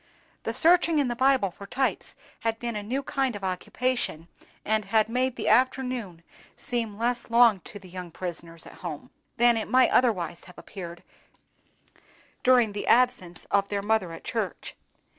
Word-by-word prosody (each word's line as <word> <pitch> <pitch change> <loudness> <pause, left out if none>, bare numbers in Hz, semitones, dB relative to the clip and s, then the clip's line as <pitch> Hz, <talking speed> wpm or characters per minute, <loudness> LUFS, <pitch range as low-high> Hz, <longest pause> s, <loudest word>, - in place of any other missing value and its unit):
The - - 0
searching 335 -1 +4
in 280 -4 +2
the 240 - -2
Bible 260 -6 +3
for 200 +2 -11
types 265 +5 -1 0.2
had 225 0 -1
been 235 -1 -4
a 210 - -2
new 255 +7 -3
kind 265 -3 -1
of 200 - -8
occupation, 185 -2 -2 0.4
and 215 -1 +1
had 215 +2 +2
made 255 +2 0
the - - -4
afternoon 250 -8 +1 0.3
seem 230 -4 -3
less 240 +1 -1
long 230 -3 +5
to - - -9
the 190 -2 -13
young 180 -1 -8
prisoners 170 -1 -7
at - - -13
home 160 -5 -7 0.3
than 240 0 +5
it 220 - -3
might 255 +3 +4
otherwise 180 -9 +1
have 180 - -15
appeared 175 -3 -9 1.4
during 250 -4 +5
the 205 - -5
absence 235 -8 +2
of 200 0 +2
their 200 -1 -2
mother 205 -4 +1
at 165 - -9
church. - - -4
220 Hz, 165 wpm, -26 LUFS, 185-250 Hz, 1.4 s, long